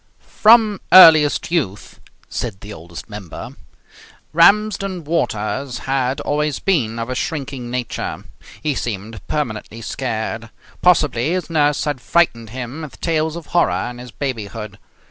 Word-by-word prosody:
From 215 -2 +4
earliest 160 -5 +7
youth 130 - -2 0.3
(said 105 -6 -5
the 105 +1 -8
Oldest 85 0 -10
Member) 105 -6 -8 0.8
Ramsden 195 +1 +3
Waters 135 -4 -2
had 135 +1 -1
always 150 0 -1
been 125 - 0
of 115 0 -3
a 130 - -3
shrinking 135 -4 -4
nature. 125 -1 -4 0.4
He 150 -2 +1
seemed 110 -4 -5
permanently 115 -5 -3
scared. 115 -1 -4 0.3
Possibly 150 -5 +3
his 180 -2 -3
nurse 150 -2 +2
had 145 -4 -2
frightened 120 -11 +1
him 130 +5 -6
with 155 -3 -9
tales 160 -1 0
of 170 -2 -7
horror 110 - +1
in 120 - -11
his 125 0 -9
babyhood. 110 -5 -5
135 Hz, 130 wpm, -19 LUFS, 115-160 Hz, 0.8 s, earliest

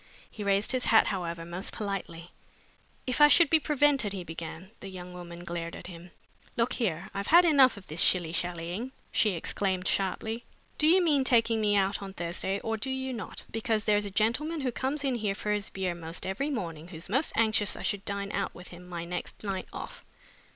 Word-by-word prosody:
He 210 - -6
raised 200 +1 +2
his 255 -1 +1
hat, 220 - +6
however, 170 -3 -3
most 175 +3 -4
politely. 185 -5 -5 0.7
"If 255 +3 0
I 295 - +11
should 325 0 +6
be 320 - +6
prevented," 290 -8 +2
he 190 -2 -4
began, 165 +3 -7
The 195 - -8
young 180 -1 -8
woman 175 -1 -9
glared 170 -1 -4
at - - -10
him. 175 0 -10 0.5
"Look 240 +2 +2
here, 190 -7 -2
I've 200 0 -3
had 345 +3 +7
enough 270 -8 +6
of 195 - -11
this 155 +2 -2
shilly 175 -3 +3
shallying!" 175 +8 -3 0.2
she 210 -3 +3
exclaimed 185 +2 -1
sharply. 220 +4 -1 0.4
"Do 305 - +4
you 360 +3 +6
mean 290 -5 +3
taking 230 -3 +3
me 205 -1 +3
out 195 0 +1
on 195 -1 -7
Thursday 175 +3 -2
or 225 0 -2
do 265 +5 -4
you 265 0 -2
not? 225 - -6
because 225 -1 -1
there's 210 -1 +3
a - - -2
gentleman 250 - 0
who 255 -2 0
comes 270 +4 -2
in 270 -2 +1
here 210 -4 -1
for 210 - -2
his 210 -1 -1
beer 190 -2 -2
most 165 0 -5
every 205 +10 -1
morning 170 - -4
who's 165 -2 -8
most 265 - +1
anxious 215 -2 +3
I - - -7
should 200 -2 -1
dine 200 0 -3
out 195 0 -2
with 180 - -11
him 180 0 -12
my 170 -1 -4
next 180 +4 -5
night 195 -2 -3
off. - - -8
200 Hz, 205 wpm, -29 LUFS, 180-240 Hz, 0.7 s, I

